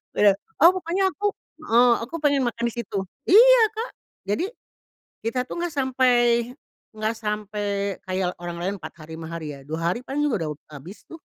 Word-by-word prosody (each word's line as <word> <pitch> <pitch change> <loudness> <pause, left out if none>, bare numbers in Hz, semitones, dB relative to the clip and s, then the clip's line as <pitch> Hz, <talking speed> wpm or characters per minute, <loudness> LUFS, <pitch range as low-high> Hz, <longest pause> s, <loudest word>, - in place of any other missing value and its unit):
Benar. 205 -2 +5 0.3
Ah, 340 - +9
pokoknya 365 +1 -1
aku 410 +3 -3 0.4
heeh, 240 +1 +6
aku 240 +8 -8
pengen 285 -2 +3
makan 235 0 -3
di - - -6
situ. 215 -4 -4 0.3
Iya 485 +5 +8
Kak. 455 +3 -4 0.4
Jadi, 210 - 0 0.8
kita 230 +3 -1
tuh - - -6
enggak 345 -3 -2
sampai 260 -2 +2 0.8
enggak 215 +1 -1
sampai 210 -1 -3 0.4
kayak 185 -1 -1
orang 175 -1 -5
lain 195 +3 -1
4 155 - -8
hari 160 0 -12
5 160 - -7
hari 160 -3 -5
ya, 140 - -10
2 160 +1 -3
hari - - -5
paling 285 +2 -2
juga 230 - 0
udah - - -2 0.2
habis 160 +9 -11
tuh. 330 - -11
230 Hz, 180 wpm, -24 LUFS, 185-295 Hz, 0.8 s, Ah